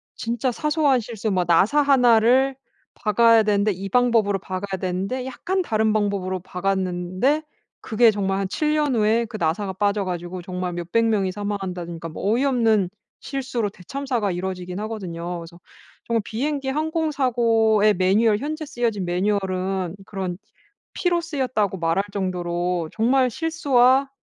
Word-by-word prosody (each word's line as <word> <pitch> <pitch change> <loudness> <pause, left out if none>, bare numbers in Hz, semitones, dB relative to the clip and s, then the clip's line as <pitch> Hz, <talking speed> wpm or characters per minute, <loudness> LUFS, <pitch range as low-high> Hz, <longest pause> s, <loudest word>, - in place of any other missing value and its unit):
진짜 235 +2 -1
사소한 295 -1 +2
실수 225 -1 -4
막 180 -2 +1
나사 195 - +4
1 250 -5 +5
를 260 +4 +3 0.4
박아야 230 0 +4
되는데 210 0 +2
이 195 +1 -5
방법으로 225 -4 +2
박아야 190 +1 -5
되는데 190 +8 -2
약간 370 +8 -2
다른 220 -6 +1
방법으로 200 -3 -1
박았는데 185 - -1 0.4
그게 225 +1 +4
정말 195 -1 -1
한 195 - -1
7 300 +5 0
년 295 -4 +1
후에 225 +1 +2
그 215 -1 -7
나사가 190 +4 -1
빠져 205 +1 0
가지고 180 0 -5
정말 180 0 -4
몇백 175 +7 0
명이 205 -4 +1
사망한다든가 185 -5 -5
뭐 195 +6 -1
어이없는 230 -7 +2 0.3
실수로 255 -6 -3
대참사가 235 +2 -3
이루어지기는 180 +1 -4
하거든요. 175 -5 -5
그래서 170 +1 -11 0.5
정말 230 -1 0
비행기 275 +4 -2
항공 315 +2 -1
사고의 225 -5 +3
매뉴얼, 205 +4 +3
현재 310 +3 -4
쓰여진 235 -7 -2
매뉴얼은 185 -1 -1
그런 190 -3 -4 0.6
피로 350 -1 +1
쓰였다고 255 - -1
말할 165 +4 +1
정도로 175 -3 -2
정말 255 +3 +2
실수와 275 -3 +2
210 Hz, 330 characters per minute, -23 LUFS, 185-250 Hz, 0.6 s, 1